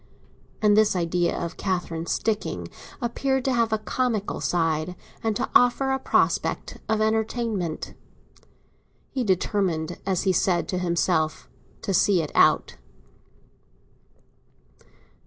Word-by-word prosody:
And 210 -1 +5
this 215 -2 +4
idea 175 0 0
of 170 - -4
Catherine 175 -3 -2
"sticking" 215 -2 -1 0.4
appeared 265 +2 0
to 265 - +2
have 230 -2 +1
a 220 - +2
comical 220 -1 -2
side, 165 0 0 0.3
and 220 -1 0
to - - -1
offer 245 +2 +4
a 265 - 0
prospect - - 0
of 220 0 +1
entertainment. 220 -5 -1 1.2
He 260 -2 -1
determined, 180 -4 0
as 190 -2 0
he 190 -1 +2
said 180 0 +1
to 180 - -1
himself, 170 -2 0 0.4
to 195 - -1
see 185 -1 +3
it 150 - -6
out. - - +3
195 Hz, 120 wpm, -25 LUFS, 175-225 Hz, 1.2 s, And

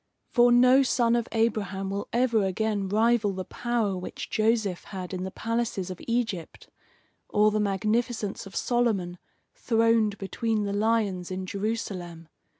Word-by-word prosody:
For 245 -1 +5
no 250 +2 +6
son 240 -3 +2
of 235 -1 0
Abraham 200 -4 -1
will 200 +1 -3
ever 235 -3 +2
again 200 0 -1
rival 220 0 +2
the 185 -1 -5
power 235 -5 -1
which 180 0 -7
Joseph 215 -4 +1
had 185 -2 -7
in 185 0 -3
the - - -3
palaces 225 -4 -2
of 185 - -8
Egypt, 225 -8 -2 0.6
or 210 +1 +4
the 215 - 0
magnificence 210 +2 -1
of 195 - -13
Solomon 210 -8 0 0.3
throned 225 -3 +2
between 215 +3 -1
the 200 0 -2
lions 205 -4 0
in 185 0 -4
Jerusalem. 185 -5 -4
215 Hz, 145 wpm, -27 LUFS, 190-230 Hz, 0.6 s, no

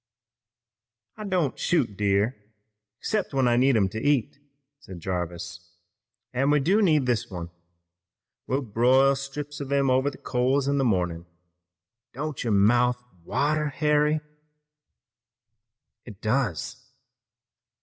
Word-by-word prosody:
"I 215 - -7
don't 180 -8 -1
shoot 125 - +1
deer, 100 +4 +1 0.7
'cept 205 -9 -2
when 130 -2 +3
I 120 - +3
need 130 0 +4
'em 100 -3 +3
to 110 +3 -5
eat," 145 -1 0 0.4
said 95 -10 -10
Jarvis, 85 -1 -5 0.6
"an' 135 +3 +1
we 150 0 +4
do 190 +10 +2
need 155 -8 +3
this 120 -3 0
one. 85 -2 -7 1.0
We'll 135 +2 0
broil 130 +5 +3
strips 140 +2 -6
of 140 -1 -6
him 140 -2 +2
over 130 +2 +2
the 140 - -12
coals 130 +2 0
in 140 0 +1
the - - +2
mornin'. 90 -7 -1 0.9
Don't 150 +2 -4
your 115 - -1
mouth 120 +5 +3 0.3
water, 150 - 0
Harry?" 150 +1 +1 1.8
"It 105 -5 -12
does." 110 - -1
130 Hz, 125 wpm, -26 LUFS, 105-145 Hz, 1.8 s, need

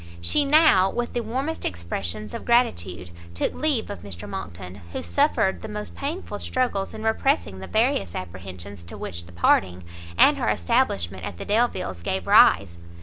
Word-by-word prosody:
She 85 - +1
now, 285 - +6
with 240 +4 -3
the 240 - -1
warmest 265 +8 -3
expressions 90 +4 -4
of - - -5
gratitude, 90 - +1 0.2
took - - -1
leave 285 -9 0
of 205 - -6
Mr 95 -4 -7
Monckton, 90 +1 -7
who - - -3
suffered 85 - +1
the - - -6
most 210 0 -6
painful 280 - -4
struggles 245 -7 -1
in 220 - -7
repressing 220 - +1
the 95 - -7
various 90 0 +1
apprehensions 90 +1 -8
to 85 - -10
which 85 0 -6
the - - -13
parting, 90 +1 +2 0.3
and - - +6
her - - +1
establishment 85 +1 0
at 90 - -6
the - - -7
Delviles 205 - 0
gave 95 +1 -2
rise. 85 -3 +5
95 Hz, 165 wpm, -24 LUFS, -, 0.3 s, now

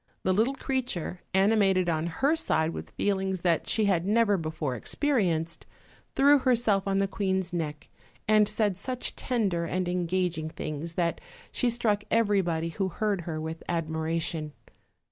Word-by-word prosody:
The 185 - +2
little 230 +8 +2
creature, 250 -11 -3
ani 195 +4 +4
mated 190 -4 +3
on 160 -1 0
her 275 - +1
side 160 - +1
with - - -7
feelings 190 -2 -1
that 170 -2 +1
she 220 - +2
had 185 -4 +2
never 210 +1 +3
before 155 -5 -3
experienced, 170 - -1 0.5
threw 285 +1 +6
herself 230 -6 +2
on 195 0 +1
the 195 0 +2
queen's 190 -3 -1
neck 150 -4 -3 0.4
and 215 -1 +5
said 210 -3 0
such 255 +4 -4
tender 200 -9 0
and 180 +2 -1
engaging 175 -2 -1
things 155 +2 -5
that 170 -2 0 0.3
she 250 - +1
struck 225 -3 0
every 210 -3 +3
body 165 -2 -1
who 190 +3 -2
heard 200 +1 -1
her 155 -1 -3
with 160 +1 -5
admiration. 160 -1 -2
185 Hz, 155 wpm, -28 LUFS, 165-215 Hz, 0.5 s, threw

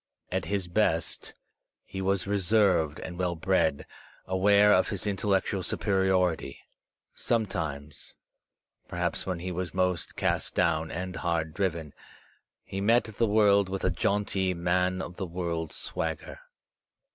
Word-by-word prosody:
At - - -1
his 100 -3 -2
best, 85 -3 0 0.5
he 95 - -6
was 95 -1 0
reserved 95 -6 +2
and 90 0 -7
well 90 -1 0
bred, 80 -4 +1 0.4
aware 100 +2 +5
of 90 - +4
his 100 -3 -3
intellectual 100 -1 0
superiority. 95 -3 +1 0.6
Sometimes, 80 -10 -3 0.7
perhaps - - -2
when 90 -2 -1
he 90 +1 -4
was 90 +1 -4
most 90 -1 0
cast - - -1
down 80 -3 +1
and 90 +2 -4
hard 80 -2 -1
driven, 85 -6 -2 0.7
he 95 0 -5
met 115 +4 +4
the 110 +1 -1
world 100 -2 +4
with 95 0 -4
a - - +2
jaunty 95 0 0
man 90 +2 +1
of 90 - -8
the 95 - -3
world 85 -2 -3
swagger. 80 - -4
95 Hz, 130 wpm, -28 LUFS, 85-100 Hz, 0.7 s, aware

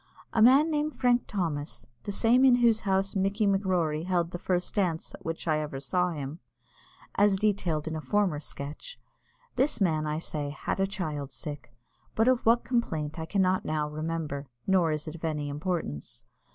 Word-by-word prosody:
A 225 - +2
man 275 +7 +6
named 300 0 -1
Frank 245 -1 +2
Thomas, 150 - -3 0.2
the - - -2
same 230 +5 +4
in 260 -2 +7
whose 235 -3 +4
house 195 0 0
Mickey 200 +3 +1
M'Rorey 180 -6 +1
held 175 -2 0
the 175 - -5
first 180 0 -1
dance 180 -6 -1
at - - -11
which 165 +1 -4
I 155 -1 +2
ever 150 -3 -4
saw 180 +6 +1
him, 150 -1 -5 0.7
as 205 -1 +4
detailed 185 -7 0
in 160 - -3
a 155 - -4
former 180 +1 +1
sketch; 150 - -8 0.6
this 270 +2 +2
man, 155 -6 +1
I 150 0 -1
say, 150 -3 -3
had 150 - -3
a 195 - +2
child 150 -8 -4
sick, 135 -1 -7 0.4
but 225 +2 +3
of 255 -3 +2
what 235 +1 +5
complaint 160 - -1
I 160 - -4
cannot 185 0 +2
now 155 -1 -1
remember, 150 -2 -4 0.2
nor 185 -4 +3
is 150 +1 -3
it 155 - -5
of 165 - -11
any 150 -3 -2
importance. 150 - -4
175 Hz, 180 wpm, -28 LUFS, 150-205 Hz, 0.7 s, in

